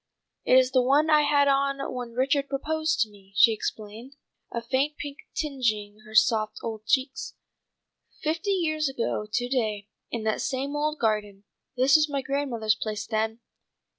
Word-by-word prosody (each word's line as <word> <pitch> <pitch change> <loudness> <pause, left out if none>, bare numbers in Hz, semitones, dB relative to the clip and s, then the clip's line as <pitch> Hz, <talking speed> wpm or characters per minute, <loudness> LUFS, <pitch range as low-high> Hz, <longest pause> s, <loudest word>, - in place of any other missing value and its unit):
"It 255 - +6
is 260 0 +4
the 255 -1 +4
one 285 +5 +3
I 305 0 +6
had 290 -1 +3
on 275 0 +2 0.2
when 245 -2 -6
Richard 275 +3 +1
proposed 315 +3 -1
to 220 - +2
me," 195 -1 -19
she 225 +3 +6
explained, 220 +4 -6 0.4
a 235 - -2
faint 265 +5 -1
pink 285 -1 -7 0.2
tingeing 225 -9 -1
her 215 - -11
soft 215 -1 +3
old 220 -1 -6
cheeks. 265 +2 0 0.9
"Fifty 330 +6 -1
years 310 -6 +1
ago 230 -4 -2
to 245 +2 0
day, 215 -5 -1 0.2
in 230 -2 -4
that 220 0 0
same 275 +2 -2
old 300 +1 -1
garden. 210 -4 -1 0.3
This 260 +2 +5
was 305 0 +1
my 280 -2 -2
grandmother's 255 -7 0
place 210 0 -4
then. 220 +1 -2
255 Hz, 165 wpm, -26 LUFS, 220-285 Hz, 0.9 s, It